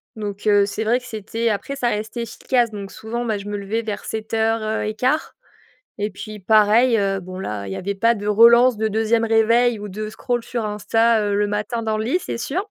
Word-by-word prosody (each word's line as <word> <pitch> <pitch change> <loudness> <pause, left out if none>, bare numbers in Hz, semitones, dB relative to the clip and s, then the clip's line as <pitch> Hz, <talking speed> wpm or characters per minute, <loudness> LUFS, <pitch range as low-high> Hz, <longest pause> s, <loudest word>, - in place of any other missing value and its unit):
Donc, 205 -1 -5
heu, 205 -1 +5
c'est 205 +2 -3
vrai 235 +3 +2
que 250 - -16
c'était 225 0 -3
après 215 +6 -3
ça 245 -3 0
restait 220 +2 -3
efficace. 240 0 0
Donc 200 -2 -7
souvent, 235 +2 -5
bah, 220 -3 -1
je 200 - -8
me 205 0 -3
levais 205 +3 -2
vers 215 -2 -5
7:00, 220 0 -1
heu 215 0 -1
et 215 - -2
1/4 260 +7 0 0.7
et 210 - 0
puis 215 +2 -8
pareil, 220 +4 +4
heu, 195 -1 0
bon, 185 0 -8
là, 105 - -4
il 95 - -4
y - - -5
avait 200 +2 -3
pas 230 +4 +2
de 205 -1 -7
relance, 235 +3 +6
de 220 +1 0
2e 225 +2 +1
réveil 225 +1 +3
ou 210 - -7
de 215 +3 -5
scroll 240 +2 -2
sur 235 -2 -3
Insta, 225 +2 +2
heu, 205 0 0
le 205 - +2
matin 210 +3 -2
dans 220 -1 -1
le 220 - -2
lit, 315 +9 +1
c'est - - -4
sûr. 340 - -3
220 Hz, 230 wpm, -21 LUFS, 205-235 Hz, 0.7 s, relance